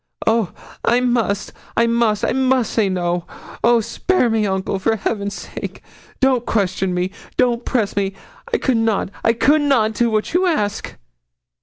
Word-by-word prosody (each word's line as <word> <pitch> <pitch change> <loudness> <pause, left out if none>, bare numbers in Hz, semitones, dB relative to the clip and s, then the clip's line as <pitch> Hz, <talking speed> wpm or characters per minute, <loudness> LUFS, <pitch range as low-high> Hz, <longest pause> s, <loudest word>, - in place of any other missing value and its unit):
'Oh! 225 -4 +2 0.3
I 240 +1 +3
must 235 -5 0 0.2
I 230 - +5
must 230 -3 +1
I - - 0
must 260 -2 +1
say 215 -4 +2
no. 175 -1 -1 0.4
Oh! 235 0 +5
spare 255 - +1
me, 220 -2 +1
uncle, 190 0 -1
for 225 +4 +1
Heaven's 200 -1 -2
sake. - - -7 0.4
Don't 260 -3 +3
question 190 -4 0
me 180 +1 -1 0.3
don't 240 -1 +1
press 220 -6 0
me. 195 -1 0 0.4
I 460 - +2
could 260 -4 +1
not 225 -4 0
I 230 - +4
could 290 +6 +3
not 245 -7 +2
do 235 +2 +1
what 215 +4 -1
you 365 +2 +3
ask.' 210 - -1
225 Hz, 165 wpm, -20 LUFS, 200-245 Hz, 0.4 s, I